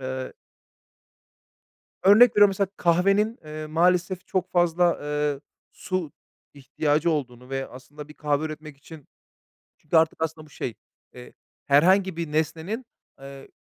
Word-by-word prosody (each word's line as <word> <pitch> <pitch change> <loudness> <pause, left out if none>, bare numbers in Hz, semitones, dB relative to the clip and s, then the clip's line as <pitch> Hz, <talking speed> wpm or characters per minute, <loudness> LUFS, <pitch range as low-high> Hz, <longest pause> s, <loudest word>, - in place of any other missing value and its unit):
eee 130 0 -5 1.7
Örnek 215 +5 +7
veriyorum, 205 -1 +7
mesela 195 0 -1
kahvenin, 195 +6 +2
eee, 155 0 -7
maalesef 180 +3 +1
çok 185 -1 -2
fazla, 175 0 +2
eee, 150 -1 -2 0.3
su 185 -5 -4 0.4
ihtiyacı 145 +4 -1
olduğunu 125 -4 -4
ve 135 0 -3
aslında 145 +4 -12
bir 150 - -13
kahve 150 0 -1
üretmek 155 -2 -8
için 150 0 -14 0.7
çünkü 155 +2 -2
artık 160 0 +2
aslında 160 -1 -4
bu - - -21
şey, 120 -4 -5 0.4
eee, 125 0 -12 0.3
herhangi 185 +6 +3
bir 165 -3 -5
nesnenin, 165 +9 -2 0.4
eee, 135 0 -11
155 Hz, 130 wpm, -24 LUFS, 145-180 Hz, 1.7 s, Örnek